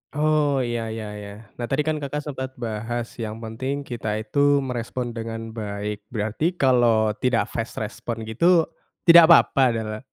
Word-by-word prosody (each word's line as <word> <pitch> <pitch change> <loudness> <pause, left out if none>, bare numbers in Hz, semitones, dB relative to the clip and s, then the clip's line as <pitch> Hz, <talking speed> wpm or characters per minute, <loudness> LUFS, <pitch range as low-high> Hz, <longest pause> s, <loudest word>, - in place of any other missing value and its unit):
Oh, 150 -3 +2
ya 120 -2 -2
ya 110 0 -5
ya. 100 0 -8 0.3
Nah, 120 - -2
tadi 135 +4 0
kan 155 0 -1
Kakak 145 +1 -4
sempet 130 -3 -6
bahas 115 0 -4
yang 110 0 -5
penting 130 +6 -4
kita 115 -5 -4
itu 140 - -3 0.2
merespon 125 -1 -4
dengan 115 0 -6
baik. 105 -1 -5
Berarti 110 - -2
kalau 120 -7 +3
tidak 125 -2 +1
fast 115 0 -4
response 115 +1 -5
gitu, 165 +11 +3 0.4
tidak 170 -1 +9
papa? 160 -4 +6
Dala 110 -1 -4
120 Hz, 155 wpm, -23 LUFS, 110-140 Hz, 0.4 s, tidak